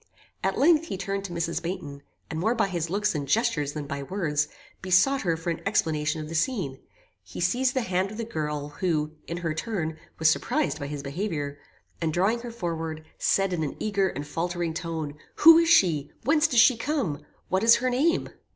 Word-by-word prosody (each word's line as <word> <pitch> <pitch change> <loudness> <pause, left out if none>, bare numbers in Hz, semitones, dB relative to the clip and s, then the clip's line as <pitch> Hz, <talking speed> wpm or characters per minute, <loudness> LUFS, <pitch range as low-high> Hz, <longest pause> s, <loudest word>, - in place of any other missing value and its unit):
At - - 0
length 320 +2 +4
he 195 - -4
turned 195 +1 -3
to 185 - -6
Mrs. 170 -1 -2
Baynton, 145 -5 -5 0.3
and 160 - -4
more 220 +7 +1
by 210 -4 +1
his 170 -3 -2
looks 205 +3 0
and 145 -3 -3
gestures 165 - +1
than 150 -2 -5
by 140 -1 -4
words, 150 -2 -1 0.3
besought 190 +9 +3
her 165 -3 0
for 165 +1 -2
an 165 - -4
explanation 155 -5 0
of 155 - -5
the 160 - -7
scene. 160 - -1 0.4
He - - -10
seized 255 +1 +1
the 260 - +1
hand 185 -1 0
of 215 - -8
the 230 - -2
girl, 150 -8 -3
who, 155 -2 -1 0.2
in 170 - -4
her 165 -3 -2
turn, 160 -4 -3 0.2
was 160 - +3
surprised 220 - +1
by 145 - -4
his 145 -1 -5
behaviour, 145 -2 -3 0.4
and 160 -1 0
drawing 195 +8 +1
her 240 0 -7
forward, 165 -7 -4
said 195 -1 +2
in 170 - -1
an 150 - -3
eager 200 -2 +1
and 145 -3 -5
faultering 170 +2 -2
tone, 160 -3 -4 0.2
Who 330 +1 +9
is 335 0 +2
she? 165 - +4
whence 300 +5 +4
does 245 -7 +3
she 250 0 +5
come? 230 - -2 0.3
what 190 +2 +1
is 230 0 +8
her 255 +1 0
name? 300 +7 +1
175 Hz, 205 wpm, -26 LUFS, 155-225 Hz, 0.4 s, Who